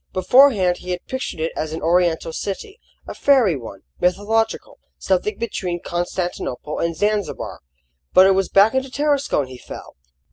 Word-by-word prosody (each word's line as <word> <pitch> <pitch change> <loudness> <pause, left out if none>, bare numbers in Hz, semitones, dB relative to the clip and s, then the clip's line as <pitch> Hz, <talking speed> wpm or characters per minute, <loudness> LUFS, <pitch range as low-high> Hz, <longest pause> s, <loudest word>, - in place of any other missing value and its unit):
Beforehand 190 -3 +4
he 180 - -10
had 180 -1 -4
pictured 260 -10 -5
it 160 +1 -1
as 155 0 -3
an 160 - -5
Oriental 170 -1 +1
city 390 - -5 0.3
a - - -6
fairy 255 - +3
one, 115 -7 -9 0.2
mythological, 215 +5 0 0.2
something 425 -4 -1
between 185 -6 -3
Constantinople 175 -5 -4
and 170 0 -1
Zanzibar; 205 +2 -2 0.5
but 185 - +7
it 195 - +5
was 195 0 0
back 200 +3 +5
into 265 0 -1
Tarascon 280 - 0
he 130 -1 -11
fell. - - -10
185 Hz, 150 wpm, -21 LUFS, 170-235 Hz, 0.5 s, but